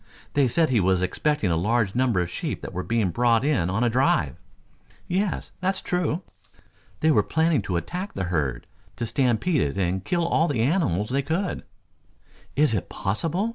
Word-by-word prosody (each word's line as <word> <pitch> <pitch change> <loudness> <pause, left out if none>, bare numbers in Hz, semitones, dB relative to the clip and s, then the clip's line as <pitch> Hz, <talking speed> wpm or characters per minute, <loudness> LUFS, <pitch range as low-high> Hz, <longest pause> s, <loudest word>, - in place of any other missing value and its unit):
They 140 -2 +3
said 155 +4 +2
he 120 - +3
was 95 -1 +2
expecting 150 - 0
a - - +2
large 105 +3 +1
number 120 -7 +2
of 90 - -2
sheep - - -4
that 95 - -6
were 90 - -2
being 110 -3 0
brought 120 +4 +2
in 130 - +1
on 105 +6 0
a - - +3
drive." 110 - +2 0.7
"Yes, 190 +1 -1
that 190 +1 0
is - - -5
true." 180 0 -1 0.8
"They 160 - +4
were - - +5
planning 160 -4 +1
to 90 -3 -2
attack 180 - -4
the 95 - -2
herd, 65 -7 -1 0.3
to 120 - -3
stampede 125 +6 +1
it 70 - -1
and 95 0 0
kill 170 - 0
all 165 0 +2
the 125 -8 0
animals 125 - +1
they 140 +2 +2
could 165 +7 -2 0.5
" - - -31
"Is 145 -3 +3
it 100 - -2
possible?" 165 - -1
120 Hz, 190 wpm, -25 LUFS, 95-160 Hz, 0.8 s, were